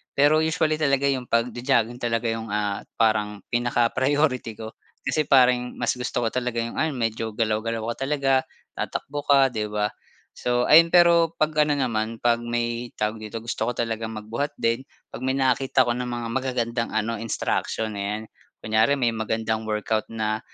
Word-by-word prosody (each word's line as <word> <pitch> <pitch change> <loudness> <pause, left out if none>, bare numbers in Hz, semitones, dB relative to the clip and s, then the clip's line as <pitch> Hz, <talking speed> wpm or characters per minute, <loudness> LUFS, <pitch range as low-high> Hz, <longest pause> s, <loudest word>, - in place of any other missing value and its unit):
Pero 145 +2 +5
usually 160 -1 +1
talaga 140 -2 +2
yung 130 -2 -1
pagjo-jogging 120 0 +1
talaga 115 -1 -1
yung, 115 -1 -4
ah, 105 -1 -1 0.2
parang 105 -2 +1
pinaka-priority 125 +2 +1
ko 110 0 -6 0.3
kasi 155 - +1
parang 125 -2 +4
mas 120 - +1
gusto 120 -1 -2
ko 115 - +1
talaga 125 -2 -1
yung 115 - -6
ano 155 -1 +1
medyo 115 -2 -2
galaw-galaw 110 0 -1
ka 135 - -5
talaga, 135 -2 +2 0.3
tatakbo 145 +1 -4
ka, 135 -1 +6
'di 110 -3 -2
ba? 105 0 +1 0.5
So 120 0 0
ayun, 165 +2 +7
pero 170 -2 +6
'pag 155 0 +2
ano 145 -1 +1
naman 115 -3 -1
'pag 120 -1 +3
may 120 0 -2
tawag 105 +1 -1
dito, 110 +1 -6
gusto 115 - -3
ko - - +1
talagang 115 -1 -2
magbuhat 115 +7 -4
din, 115 +3 0 0.3
'pag - - -7
may 130 - +1
nakakita 130 0 +3
ko - - +2
ng 125 0 -3
mga 120 -1 -4
magagandang 120 -3 -1
ano 110 +1 0
instruction, 110 -1 -2
ayan. 105 +2 -3 0.4
Kunyari 110 +5 +3
may 120 -4 +1
magandang 110 0 -2
workout 110 0 -1
na, 110 -1 -2
120 Hz, 165 wpm, -24 LUFS, 110-130 Hz, 0.5 s, ayun